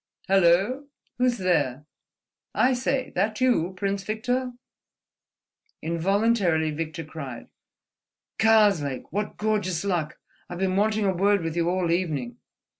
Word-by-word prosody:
"Hello? 195 +9 +3 0.3
Who's 250 -1 +2
there? 150 - 0 0.7
I 260 +1 +3
say: 260 +1 -1
that 215 +4 0
you, 190 -9 +1
Prince 195 0 -2
Victor?" 245 +4 -2 1.3
Involuntarily 175 -1 +1
Victor 160 +1 -4
cried: 140 -6 -8 0.9
"Karslake!" 205 -11 +3
"What 205 +2 -3
gorgeous 205 -5 -1
luck! 170 -6 -1 0.3
I've 175 - -6
been 190 0 0
wanting 215 +1 +1
a 190 - +2
word 200 +1 +2
with 165 0 -3
you 170 0 +1
all 180 -2 0
evening." 155 -9 -2
190 Hz, 115 wpm, -25 LUFS, 165-215 Hz, 1.3 s, Hello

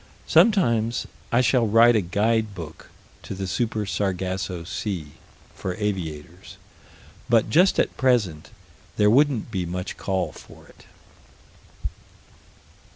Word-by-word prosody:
Sometime 160 - +4 0.4
I 120 - +4
shall 125 -2 +3
write 115 +3 +6
a 110 - +3
guide 105 +3 0
book 80 -3 -9 0.3
to - - -7
the 95 0 -4
Super 110 +2 -1
Sargasso 95 -2 -2
Sea, 90 -5 -4 0.4
for 90 -1 -4
aviators, 90 -4 -5 0.7
but 115 -2 +3
just 180 +5 +4
at - - +1
present 115 - +1 0.5
there 105 0 +4
wouldn't 135 -2 +2
be 95 -4 -2
much 90 +2 -5
call 95 -2 -2
for - - -15
it. - - -20
105 Hz, 115 wpm, -24 LUFS, 90-115 Hz, 0.7 s, write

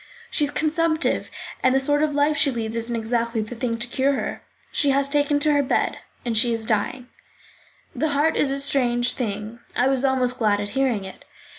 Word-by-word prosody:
"She 295 - +1
is - - -2
consumptive, 315 +2 0 0.3
and 260 0 +3
the - - +4
sort 290 +2 +2
of 305 -2 0
life 290 +1 +2
she 285 -2 +3
leads 230 -3 -3
isn't 230 +1 -1
exactly 230 0 -1
the 215 +3 -6
thing 230 -1 -2
to 235 - 0
cure 265 +3 +1
her. - - -3 0.3
She 290 - +1
has 275 0 +3
taken 290 0 +1
to 300 0 +3
her 285 - +3
bed; 270 - 0 0.3
she 235 +2 +4
is 225 -1 -1
dying." 225 +3 -1 0.9
The 315 - 0
heart 295 +3 +2
is 280 - +2
a 275 +1 0
strange 250 -3 +2
thing; 215 -1 -4 0.2
I 250 - +3
was 270 -1 0
almost 255 -2 +1
glad 210 -3 +2
at 205 0 -3
hearing 250 -5 0
it. 190 - -11
260 Hz, 200 wpm, -23 LUFS, 230-285 Hz, 0.9 s, the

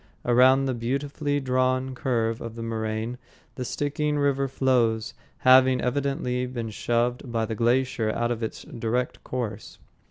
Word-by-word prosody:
Around 130 +3 +5
the 130 - 0
beautifully 140 +4 -2
drawn 130 0 0
curve 115 -3 -1
of 115 -1 -6
the 115 - -5
moraine 110 +1 -3 0.3
the - - -8
Stickeen 145 +3 -1
River 140 -1 +1
flows, 125 -4 +1 0.2
having 130 0 +6
evidently 125 -1 -1
been 120 -3 -5
shoved 120 +3 -1
by 115 -1 0
the 110 - -4
glacier 120 0 +1
out 120 +2 0
of 120 -1 -3
its 110 - -4
direct 120 +2 -3
course. 110 -5 -5
125 Hz, 140 wpm, -26 LUFS, 115-130 Hz, 0.3 s, having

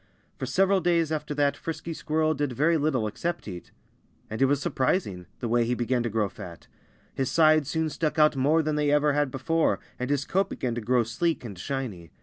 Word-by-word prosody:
For - - -3
several 195 0 +3
days 170 -2 +2
after 150 -1 -3
that 145 -1 +2
Frisky 165 0 -5
Squirrel 155 0 0
did 145 -3 -2
very 155 +7 +2
little 145 -7 +1
except 170 +10 -3
eat. 90 -4 -8 0.6
And 110 - -4
it - - +6
was 140 +1 +2
surprising 130 - -1
the 120 - -2
way 120 +1 +2
he 120 +2 0
began 120 +1 0
to 120 - -1
grow 105 -1 0
fat. 85 -3 -10 0.5
His 135 -2 -1
sides 155 -3 +4
soon 160 -1 0
stuck 155 +1 -2
out 150 -1 +5
more 150 +5 +3
than 155 0 -1
they 150 -1 +1
ever 145 0 +3
had 145 -1 +1
before, 160 +6 0 0.2
and 125 +1 -3
his 140 0 0
coat 195 +2 0
began 125 -2 -3
to 120 - -3
grow 120 +2 +2
sleek 125 +6 -1
and 105 -4 -7
shiny. 105 - -5
145 Hz, 210 wpm, -26 LUFS, 120-155 Hz, 0.6 s, it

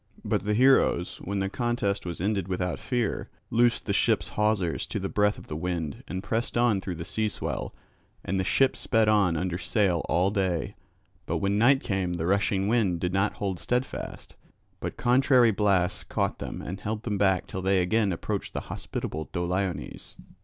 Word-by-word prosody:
But - - 0
the 105 0 +1
heroes, 130 -8 +3
when 100 +2 -4
the 95 - 0
contest 105 -3 -1
was 85 - -4
ended 100 0 0
without 90 -1 -2
fear, 120 -4 -2 0.2
loosed 120 +1 +3
the - - 0
ship's - - +2
hawsers 105 -6 0
to - - -3
the - - -3
breath 105 0 +2
of - - -11
the 75 - -6
wind 80 -3 -3
and 95 0 -4
pressed 115 +4 -1
on 120 -5 +3
through 95 -2 -4
the 85 0 -6
sea 110 -1 0
swell. - - -4 0.5
And 95 +1 -1
the - - +1
ship 135 +8 +3
sped 115 -3 +2
on 100 -6 +3
under 90 0 -2
sail 95 -5 +1
all 90 +3 +2
day; 95 -5 -1 0.5
but - - 0
when 100 +1 0
night 135 +4 +5
came 95 -4 -1
the 85 -2 -2
rushing 100 +1 +1
wind 105 -7 +2
did 90 +1 -1
not 95 +2 +1
hold 95 -3 -3
steadfast, 125 +2 -3 0.4
but - - -5
contrary 125 -1 +4
blasts 95 -3 +1
caught - - -2
them - - -6
and 95 +3 -5
held 110 +3 -4
them 105 -5 -2
back 95 -2 +3
till 95 - -5
they 95 0 +2
again 100 +3 +2
approached 85 - -3
the - - -2
hospitable 80 0 -5
Doliones. 90 +1 -3
100 Hz, 185 wpm, -27 LUFS, 90-110 Hz, 0.5 s, night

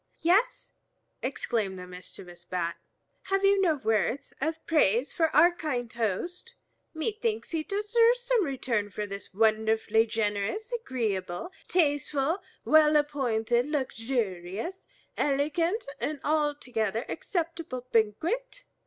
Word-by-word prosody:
"Yes," 385 +9 +2 0.5
exclaimed 220 -7 -2
the 180 - -7
mischievous 180 -1 -11
Bat, 175 -1 -2 0.5
"have 390 0 +1
you 395 0 +5
no 335 -5 +3
words 225 0 0
of 320 +2 -2
praise 275 -4 +3
for 325 - +3
our 345 - +7
kind 250 -8 -3
host? 295 - -3 0.4
Methinks 435 +6 -2
he 325 -2 0
deserves 455 +7 +3
some - - +2
return 250 - -1
for 210 +2 -4
this 200 0 -8
wonderfully 220 +1 +2
generous, 215 - -1
agreeable, 225 - -2 0.2
tasteful, 295 -1 +1 0.3
well 305 -1 +6
appointed, 245 -5 +1
luxurious, 230 - -3 0.3
elegant, 330 +9 +1
and 300 -1 -2
altogether 255 -8 0
acceptable 330 -8 -3
banquet. 345 - 0
275 Hz, 110 wpm, -28 LUFS, 220-345 Hz, 0.5 s, our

